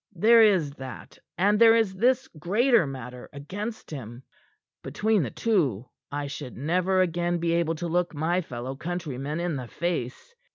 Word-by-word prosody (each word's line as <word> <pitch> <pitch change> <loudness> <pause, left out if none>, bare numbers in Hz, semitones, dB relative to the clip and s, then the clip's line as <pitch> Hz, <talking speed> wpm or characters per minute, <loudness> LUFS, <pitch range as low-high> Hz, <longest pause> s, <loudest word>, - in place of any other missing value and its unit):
There 225 +6 +6
is 185 -9 +4
that, 130 -1 -9 0.2
and 205 +4 +3
there 230 -1 +7
is 220 -4 +2
this 250 +6 +2
greater 205 - +2
matter 125 -2 -8
against 205 +12 -6
him. 120 -3 -8 0.6
Between 215 -2 +1
the 130 - -2
two, 135 - 0 0.2
I 145 0 -3
should 140 -2 -7
never 180 +7 +1
again 175 0 0
be 170 0 -1
able 170 -1 +1
to 170 +2 -4
look 175 +1 0
my 170 +5 0
fellow 130 -3 -6
countrymen 155 -2 -4
in 170 -4 -2
the 125 -2 -6
face. 170 - -4
170 Hz, 160 wpm, -26 LUFS, 140-195 Hz, 0.6 s, there